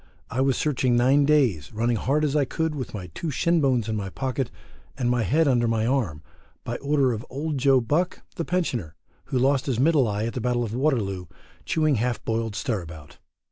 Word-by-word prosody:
I 130 - 0
was 135 -1 +2
searching 130 -4 +1
nine 135 +4 +4
days, 125 - +2
running 115 +2 0
hard 150 +7 +1
as 145 0 -1
I 150 - +4
could 160 +4 -2
with 130 -6 -5
my 90 -5 -7
two 165 - -4
shin 170 +3 +2
bones 125 -5 +2
in 110 - -1
my 100 -2 -3
pocket, 130 +4 -2 0.5
and 125 -2 +1
my 125 -1 +1
head 155 +7 +2
under 120 -3 +3
my 115 -1 +1
arm, 110 - -1 0.4
by 120 - -3
order 140 -3 +1
of 110 0 -5
Old 145 +2 -3
Joe 135 0 +5
Buck, 150 +10 -1
the 170 - -2
Pensioner, 125 - -2 0.3
who 130 - -2
lost 135 +2 +2
his 125 -4 0
middle 145 -2 +4
eye 105 +1 -1
at 115 - -3
the 125 - -3
Battle 120 +1 0
of 110 -2 -4
Waterloo, 110 - 0 0.4
chewing 155 -4 +2
half 120 +2 -2
boiled 115 -2 -1
stirabout. 85 - -5
125 Hz, 205 wpm, -25 LUFS, 110-140 Hz, 0.5 s, Joe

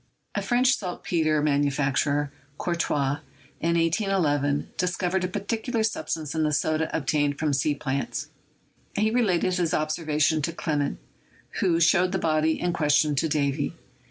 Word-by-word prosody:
A - - -1
French 250 +2 +3
saltpeter 160 -5 -1
manufacturer, 145 0 +1 0.2
Courtois, 145 -5 0 0.4
in 170 +1 +1
181 185 +3 +1
1 145 0 -1
dis 180 0 0
covered 185 +1 0
a - - +1
peculiar 220 +5 -2
substance 160 -8 -2
in 160 - 0
the 155 -1 +2
soda 155 +2 0
obtained 145 0 0
from 155 -2 0
sea 145 +2 +1
plants; 140 -1 -3 0.7
he 215 +1 +2
related 190 -7 +2
his 170 -3 +1
observation 155 0 +1
to 165 +3 -2
Clement, 150 -4 -1 0.6
who 170 -3 +2
showed 180 +2 +4
the - - +2
body 160 -2 +1
in 175 -1 0
question 150 -1 +3
to 155 +3 0
Davy. 140 -2 0
160 Hz, 145 wpm, -26 LUFS, 145-180 Hz, 0.7 s, showed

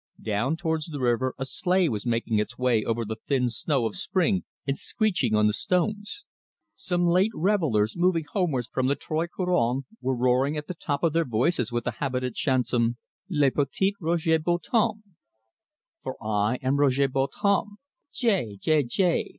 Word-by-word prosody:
Down 115 +8 0
towards 160 -2 -2
the 150 -3 -6
river 125 +1 +1
a 135 - -3
sleigh 180 +5 +1
was 105 -4 -3
making 115 -2 +1
its 110 +3 -3
way 125 -4 +2
over 115 0 -1
the 110 +1 -5
thin 125 -4 +1
snow 130 +1 0
of 110 - -3
spring, 190 +1 0 0.2
and 135 0 0
screeching 180 - 0
on 105 0 +4
the 105 - +3
stones. 205 - -1 0.5
Some 175 -1 -1
late 180 +4 +4
revellers, 155 - +1
moving 175 -2 +2
homewards 150 -10 0
from 130 +3 -1
the 140 - +2
Trois 160 +3 -2
Couronnes, 140 -9 0 0.2
were 130 0 0
roaring 130 +4 +2
at 150 - -4
the 185 - -5
top 145 -4 -3
of 165 -3 +2
their 165 0 +3
voices 125 0 0
the 120 -1 -3
habitant 125 -3 -2
chanson, 120 -3 +1 0.3
'Le 145 -6 +3
Petit 150 +9 0
Roger 160 -1 +2
Bontemps': 210 +6 0 1.0
"For 130 - -5
I 105 +1 0
am 135 +2 +1
Roger 140 -1 +3
Bontemps, 195 +10 0 0.4
Gai, 190 - +1
gai, 155 +4 +3
gai! 170 +7 +1
140 Hz, 165 wpm, -26 LUFS, 120-175 Hz, 1.0 s, on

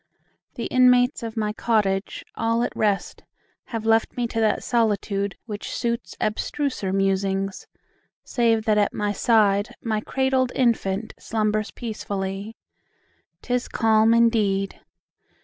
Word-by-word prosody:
The - - -4
inmates 250 +1 +4
of 230 -1 -6
my 210 -1 -1
cottage, 210 -4 0
all 230 +1 0
at - - -3
rest, 205 -2 -1 0.4
Have 225 -2 -5
left 225 +2 +2
me 245 - 0
to 225 - -2
that 220 -1 +1
solitude, 205 -4 0
which 210 -3 -6
suits 235 -6 -3
Abstruser 215 -1 -2
musings: 195 0 -1 0.6
save 230 -3 +1
that 215 -2 +3
at 205 - +1
my 205 0 0
side 210 +1 +2
My 220 -2 -2
cradled 265 +1 0
infant 220 -4 0
slumbers 215 -1 -1
peacefully. 200 -2 -5 0.9
'Tis 250 0 -1
calm 225 0 +3
indeed! 210 -4 +2
220 Hz, 120 wpm, -24 LUFS, 200-235 Hz, 0.9 s, inmates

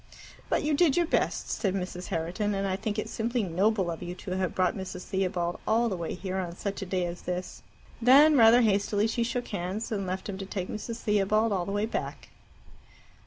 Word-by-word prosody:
"But - - +1
you 300 +1 +1
did 295 -1 +3
your 345 - +4
best," - - 0
said 195 -3 -1
Mrs. 180 -1 -4
Herriton. 180 +6 -1
"And 195 0 -1
I 190 - 0
think 210 +2 -3
it 215 - -2
simply 235 +1 -1
noble 190 +1 +1
of 165 - -6
you 175 +1 -5
to 185 - -8
have 185 -1 -1
brought 185 -1 +2
Mrs. 185 -2 -6
Theobald 180 -3 -1
all 230 +2 +3
the 195 - -2
way 170 -2 -4
here 185 0 -4
on 175 -2 -3
such 200 +2 -4
a 195 - -4
day 185 -1 0
as 175 0 -5
this." 180 0 -5 0.4
Then, 285 +6 +7
rather 235 -1 +7
hastily, 205 -1 +2
she 230 +2 -1
shook 245 +1 -2
hands, 200 +3 -3
and 195 -3 -2
left 185 +1 -3
him 195 -2 -5
to 195 - -4
take 185 -2 -4
Mrs. 225 +2 -5
Theobald 210 +1 +2
all 180 -3 -1
the - - -2
way 205 +1 0
back. 225 - -5
195 Hz, 215 wpm, -28 LUFS, 185-225 Hz, 0.4 s, Then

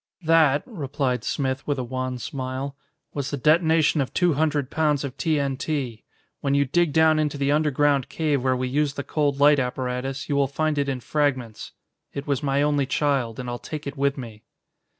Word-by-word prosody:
"That," 155 -3 +4
replied 140 - -2
Smith 135 -1 -2
with 145 -1 0
a 130 - -2
wan 130 +1 -3
smile, 130 +2 -5 0.4
"was 140 -2 -3
the 145 - -3
detonation 160 +1 +3
of 130 - -3
two 175 -2 +3
hundred 145 -2 0
pounds 150 -3 +1
of 135 -2 -5
T.N.T. 140 -5 -1 0.4
When 140 -1 0
you 140 0 +3
dig 170 +4 +1
down 160 0 +4
into 150 -1 -1
the 140 0 +1
underground 145 -2 +2
cave 150 -5 0
where 130 -1 +2
we 130 0 -1
used 145 +2 0
the 140 - -3
cold 145 -2 0
light 145 0 +6
apparatus, 125 +1 -3
you 145 - -1
will 140 -1 +3
find 155 +2 -1
it 140 -1 0
in 130 -2 -3
fragments. 130 -6 -2 0.4
It 140 0 -4
was 140 -3 -1
my 140 0 +1
only 145 -2 +1
child, 135 -6 0
and 125 - -5
I'll 120 0 -4
take 155 -1 -7
it 140 - -5
with 140 0 0
me." 115 -5 -8
140 Hz, 190 wpm, -24 LUFS, 130-150 Hz, 0.4 s, light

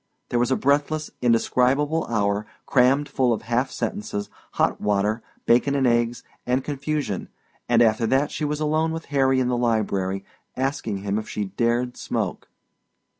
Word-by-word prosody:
There 120 - +1
was 120 - +2
a 130 - +3
breathless 145 +3 +1
indescribable 130 +6 +2
hour 105 -2 0 0.2
crammed 135 +3 +3
full 130 -3 +1
of 110 - -4
self 120 +3 +1
sentences, 200 - -4 0.2
hot - - +1
water, 105 +2 +1 0.2
bacon 125 +4 +3
and 135 -2 +2
eggs 120 0 +1 0.2
and 125 +2 0
confusion; 145 - -3 0.4
and 120 0 +5
after 110 0 +2
that 135 +5 +2
she - - -4
was 150 0 -1
alone 155 +1 +1
with 165 0 -5
Harry 135 -1 +3
in 130 - +1
the 125 - +1
library, 100 -5 0 0.3
asking 120 -7 -2
him 100 +1 0
if 110 - -8
she 105 - -2
dared 120 +5 0
smoke. - - -3
125 Hz, 160 wpm, -24 LUFS, 110-140 Hz, 0.4 s, and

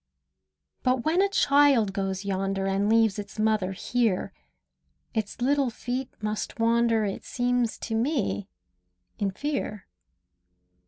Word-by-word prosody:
But 255 -1 +1
when 330 +4 +3
a 400 - +3
child 280 - +4
goes 195 0 -2
yonder 195 0 -1
And 195 +2 +1
leaves 225 -2 +3
its 205 0 -8
mother 215 -3 +1
here, 220 -1 0 0.8
Its 220 -2 -3
little 275 0 +2
feet 250 +3 -4
must 215 +1 -3
wander, 230 -1 +3
It 195 - -4
seems 245 -2 0
to 225 - -5
me, 225 -4 0 0.7
in 200 -2 +1
fear. 215 -3 -3
225 Hz, 120 wpm, -27 LUFS, 200-250 Hz, 0.8 s, child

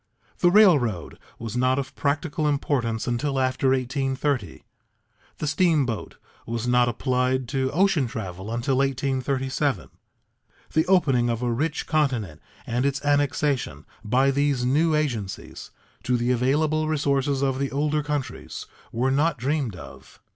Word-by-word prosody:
The 175 - +5
railroad 150 - +3 0.2
was 115 0 -6
not 130 +1 +2
of 135 -1 -4
practical 150 +1 -1
importance 130 -6 0
until 135 +3 -1
after 130 0 +1
1830; 130 - -1 0.7
the - - -3
steamboat 150 - 0 0.3
was 115 +1 -3
not 125 0 +4
applied 125 +1 0
to 130 0 0
ocean 170 -6 +2
travel 95 -4 -6
until 125 +3 0
1837. 135 0 -1 0.8
The 160 - +2
opening 135 -10 +3
of 115 +1 -2
a 120 - 0
rich 150 +6 -1
continent 125 - -1 0.2
and 120 +2 -1
its 140 0 -1
annexation, 145 - 0 0.2
by 130 +5 +3
these 140 -2 +1
new 155 +5 +2
agencies, 120 -11 -3 0.3
to 125 -1 +1
the 120 +1 0
available 150 +5 +1
resources 140 -2 0
of 135 -1 0
the 140 0 -1
older 150 +2 0
countries 145 -2 -4 0.3
were 125 +3 0
not 150 +3 +2
dreamed 130 -3 -1
of. 80 - -13
135 Hz, 135 wpm, -24 LUFS, 120-145 Hz, 0.8 s, The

